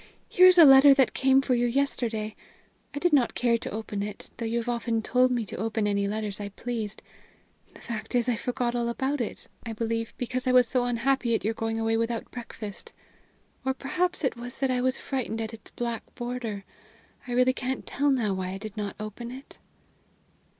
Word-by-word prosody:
Here 365 +1 +7
is 365 0 +6
a 335 - +10
letter 270 0 +9
that 265 -3 +3
came 265 0 +4
for 265 - +1
you 240 0 +2
yesterday. 235 -5 -1 0.6
I 290 - -7
did 345 +2 +1
not 265 -5 +3
care 235 -1 +2
to - - -5
open 215 -1 -4
it, 205 0 -6
though 230 - -3
you 230 +1 -1
have 235 0 -3
often 235 -2 -1
told 255 +2 +3
me 240 -3 -1
to - - -8
open 220 +1 -1
any 200 -1 +1
letters 210 -1 -3
I 205 -1 -4
pleased. 220 -1 -5 0.7
The - - -14
fact 235 +2 -5
is, 240 -1 +2
I 245 - +2
forgot 245 +1 -2
all 240 -1 0
about 265 +3 -1
it; 230 - -5 0.2
I 230 - -5
believe, 230 0 -2
because 255 +1 -3
I 255 - +3
was 250 -1 +6
so 250 0 +1
unhappy 245 0 +1
at - - -2
your 220 +2 0
going 225 0 -2
away 225 0 +1
without 230 0 -2
breakfast. 220 -4 -8 0.7
Or 265 0 0
perhaps 355 +6 -1
it 265 - +1
was 240 +1 -8
that 265 -1 0
I 250 -1 +1
was 255 +1 +1
frightened 250 -5 -3
at 225 0 -4
its 220 - -11
black 235 -2 -5
border. 240 -5 -4 0.6
I 245 - -3
really 250 +1 +4
can't 260 0 -3
tell 285 +1 0
now 235 -7 +1
why 185 0 -3
I - - -4
did 215 0 -8
not 205 -2 -4
open 215 +3 -6
it." 260 +3 -11
235 Hz, 210 wpm, -27 LUFS, 220-255 Hz, 0.7 s, a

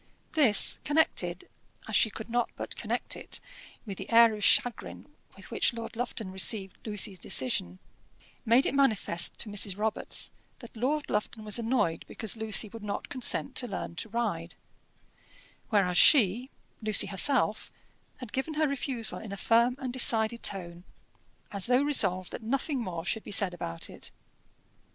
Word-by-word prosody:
This 255 -10 +4
connected, 315 +3 0 0.4
as - - -3
she 220 - +4
could 220 +1 -9
not 240 0 -1
but - - -7
connect - - -3
it, - - -5 0.5
with 200 -4 -8
the - - -8
air 230 -1 +6
of 210 -1 -6
chagrin 245 +3 +1 0.3
with - - -14
which - - +1
Lord 230 -1 -8
Lufton 225 -4 -4
received 190 0 0
Lucy's 205 -3 -1
decision, 90 - -1 0.7
made 235 +5 +3
it - - -1
manifest 220 -11 +1
to - - -5
Mrs. 200 -2 0
Robarts 215 +1 -1 0.3
that 235 -2 -14
Lord 285 +6 -2
Lufton 215 +1 -3
was 210 +2 +5
annoyed 225 -8 -1
because 220 -2 -3
Lucy 220 -1 0
would 230 +2 -11
not 205 -1 -5
consent 260 +1 -1
to 245 - +2
learn 190 -5 -6
to 225 - -5
ride; 200 -7 -3 1.1
whereas 190 -5 +2
she, 245 - +5 0.3
Lucy 215 -2 +4
herself, 215 +1 +2 0.5
had 250 -5 -11
given 285 +4 -3
her 310 0 +1
refusal 260 -4 -1
in 220 - -9
a 200 - -6
firm 235 +4 +2
and 255 -2 -6
decided 235 -2 +4
tone, 175 -3 -3 0.7
as 200 0 -2
though 250 +2 +3
resolved 190 -11 +3
that - - -7
nothing 270 +4 -2
more 175 -7 -5
should 220 +3 -2
be - - -11
said 200 -2 +2
about 85 - -3
it. - - -8
220 Hz, 160 wpm, -28 LUFS, 195-245 Hz, 1.1 s, air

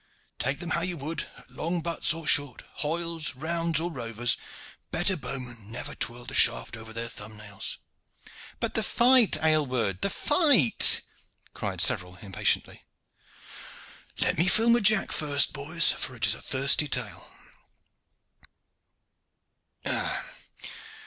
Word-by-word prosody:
Take 135 +3 -1
them 170 -1 -6
how 170 - 0
you 180 0 -1
would, 155 +3 -3
at - - -18
long 170 +1 -3
butts 170 0 0
or 165 0 -2
short, 145 -3 +3 0.2
hoyles, 165 -1 -2
rounds, 165 +2 0
or 170 +2 -3
rovers, 120 -3 -1 0.5
better 185 +3 +2
bowmen 125 - -6
never 115 - -5
twirled 120 0 -4
a - - -9
shaft - - +3
over 110 0 -11
their 115 +1 -4
thumb 110 -1 -9
nails." 105 -2 -6 0.8
"But - - -2
the - - +2
fight, 245 -2 +4
Aylward, 130 -11 0
the - - 0
fight!" 285 - +4 0.5
cried - - -4
several 90 0 +2
impatiently. 95 +1 -2 1.3
"Let - - 0
me 170 - +2
fill 225 +5 +4
my 240 - +4
jack 215 -1 +3
first, 145 -2 +2
boys, 155 +3 +3
for 130 - -5
it 110 -4 0
is 105 - +4
a - - -8
thirsty 140 +2 +1
tale. 125 -6 -5
145 Hz, 130 wpm, -26 LUFS, 115-170 Hz, 1.3 s, fight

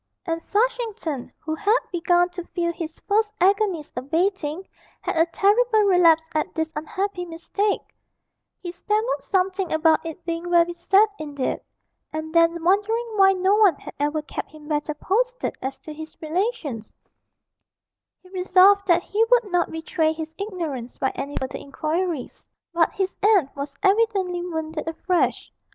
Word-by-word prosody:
And 330 -1 -3
Flushington, 415 - -1
who 315 - -4
had 415 +8 +2
begun 350 0 +2
to 355 0 -7
feel 340 0 -2
his 330 -1 -6
first 425 +1 +2
agonies 385 -4 +2
abating, 330 +5 -1 0.3
had - - -3
a 325 +1 +3
terrible 435 +5 +3
relapse 335 -5 +5
at 310 - -2
this 320 0 -2
unhappy 360 +4 -3
mistake; 355 +5 -2 0.8
he 350 - -6
stammered 425 +7 -1
something 380 -1 0
about 315 0 +3
it 330 +1 -8
being 335 +1 -3
very 345 0 +4
sad 385 +5 +4
indeed, 285 -4 -3 0.5
and 315 0 -5
then, 335 0 +3
wondering 415 +6 +2
why 390 -1 +6
no 375 +1 +2
one 405 -7 +5
had - - -11
ever 295 +1 0
kept - - -6
him 305 -1 -14
better 300 0 -1
posted - - -1
as 270 +1 -4
to 310 - -8
his 315 +1 -10
relations, 315 - -3 1.3
he 365 - -17
resolved 380 +2 +4
that 345 -1 +4
he 425 +3 +1
would 470 -4 +2
not 355 -1 +2
betray 320 0 0
his 320 0 -7
ignorance 325 - -5
by 265 - 0
any 285 +1 -5
further 260 - -4
inquiries. 310 +1 -3 0.2
But 335 -1 +3
his 380 -1 -2
aunt 395 -9 +3
was 280 0 -6
evidently 390 -3 +2
wounded 320 -2 -4
afresh. 345 +2 0
345 Hz, 150 wpm, -23 LUFS, 315-395 Hz, 1.3 s, why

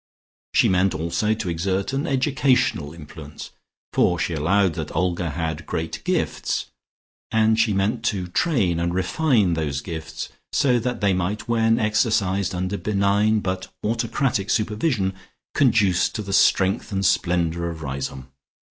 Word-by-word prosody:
She - - +5
meant 95 +1 +2
also 85 +7 0
to 105 - -5
exert 95 +7 -1
an 140 +5 -1
educational 130 - +1
influence, 75 -2 -10 0.4
for 90 - +3
she 85 - -1
allowed 90 +4 +2
that - - -6
Olga 90 0 0
had 80 0 -4
great 80 0 -3
gifts, - - -1 0.6
and 110 0 +3
she 115 -1 +3
meant 105 +4 0
to 95 -5 0
train 90 - +1
and 85 +1 -1
refine 100 - +2
those 75 -4 -2
gifts 80 -2 -6 0.2
so 125 -5 +3
that 125 +1 -3
they 100 -2 +3
might, 95 +5 -2
when 115 -1 +2
exercised 105 -4 +1
under 95 +3 -2
benign 105 +1 +2
but 95 0 -4
autocratic 115 -1 -1
supervision, 105 -2 0 0.4
conduce 105 - +3
to 105 - -5
the 100 -1 -5
strength 95 0 +3
and 95 -1 -1
splendour 85 -1 +1
of 80 -1 -7
Riseholme. 65 -1 -5
95 Hz, 140 wpm, -23 LUFS, 85-110 Hz, 0.6 s, She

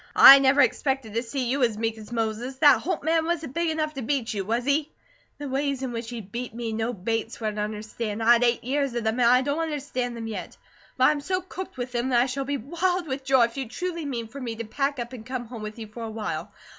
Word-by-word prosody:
I 275 +1 +11
never 275 +1 +5
expected 265 -8 0
to 230 - +1
see 255 +2 -3
you 265 +4 0
as 230 -4 +2
meek 225 0 -1
as 220 +1 -12
Moses. 230 +3 -2
That 285 0 +6
Holt 345 -2 -2
man 320 +1 +2
wasn't 325 -5 -2
big 335 +1 0
enough 310 -1 -1
to 270 - -5
beat 245 -1 -1
you, 200 -2 -2
was 230 +5 -1
he?" 290 +2 +1 0.5
"The 290 0 -6
ways 275 0 -1
in 260 - -2
which 230 -1 -5
he 240 -2 -5
'beat' 230 +4 -6
me 230 -2 -3
no 225 +2 -1
Bates 225 +2 -3
would 215 -2 -2
understand. 215 +1 -4
I 235 +2 +7
had 240 0 +3
eight 240 -1 +2
years 275 0 -1
of 235 - -1
them, 220 +2 0
and 235 -1 +5
I 250 +1 +5
don't 285 +3 -1
understand 275 -6 -3
them 225 - -5
yet; 225 -1 -6 0.4
but 255 - +2
I 260 - +7
am 295 -1 -2
so 370 +5 -1
cooked 370 -3 -8
with 250 0 -4
them, 245 +1 -1
that 245 -2 +4
I 245 - +4
shall 270 +1 -3
be 280 +1 -1
wild 345 +7 -1
with 270 -2 -4
joy 265 -2 +4
if 230 +2 -1
you 265 -4 -3
truly 340 +3 -4
mean 240 -5 -3
for 275 +5 -9
me 235 -3 -4
to 230 - -5
pack 275 +5 -1
up 240 +1 -5
and 235 -4 -8
come 255 0 -4
home 235 -1 -8
with 215 +1 -6
you 225 - -6
for 220 +2 -10
awhile." 220 -1 -4
250 Hz, 265 wpm, -26 LUFS, 225-280 Hz, 0.5 s, I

